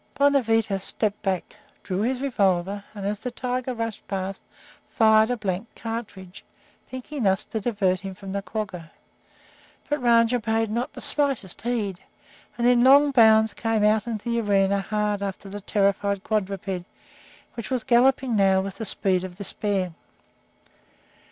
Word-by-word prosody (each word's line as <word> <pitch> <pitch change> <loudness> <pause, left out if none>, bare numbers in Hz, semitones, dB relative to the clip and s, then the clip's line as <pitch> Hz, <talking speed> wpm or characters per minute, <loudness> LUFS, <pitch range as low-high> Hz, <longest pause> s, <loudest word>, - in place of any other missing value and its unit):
Bonavita 230 -8 +2
stepped 205 +2 -2
back, 190 -4 -2 0.3
drew 190 0 -2
his 250 +3 -1
revolver, 200 -6 0
and, 200 -1 -6
as 205 0 -2
the 250 - -4
tiger 250 +1 -3
rushed 230 -2 -5
past, 195 0 -4 0.5
fired 220 -1 +4
a 245 - 0
blank 200 0 -3
cartridge, 210 -5 -7 0.5
thinking 260 +2 -6
thus 190 -3 +2
to 220 - -4
divert 200 -5 0
him 190 0 -7
from 195 0 -9
the 200 +1 -2
quagga. 195 -6 -5 1.0
But 295 -2 -1
Rajah 235 0 +4
paid 225 -1 0
not 235 +3 -2
the - - -9
slightest 275 -10 0
heed, 215 -6 -2 0.6
and 235 - 0
in 245 -1 +5
long 280 +2 +6
bounds 220 -3 +5
came 225 -2 0
out 215 +1 +3
into 225 0 -4
the 235 0 +1
arena 200 -1 +2
hard 210 0 -1
after 195 0 -5
the 205 +1 -7
terrified 200 -1 0
quadruped, 195 -3 -2 0.7
which 230 - -7
was 255 -3 -1
galloping 250 0 +3
now 195 -2 +4
with 195 0 -4
the 225 - -5
speed 185 -2 +1
of 185 -1 -7
despair. 195 -2 -2
210 Hz, 150 wpm, -24 LUFS, 195-235 Hz, 1.0 s, long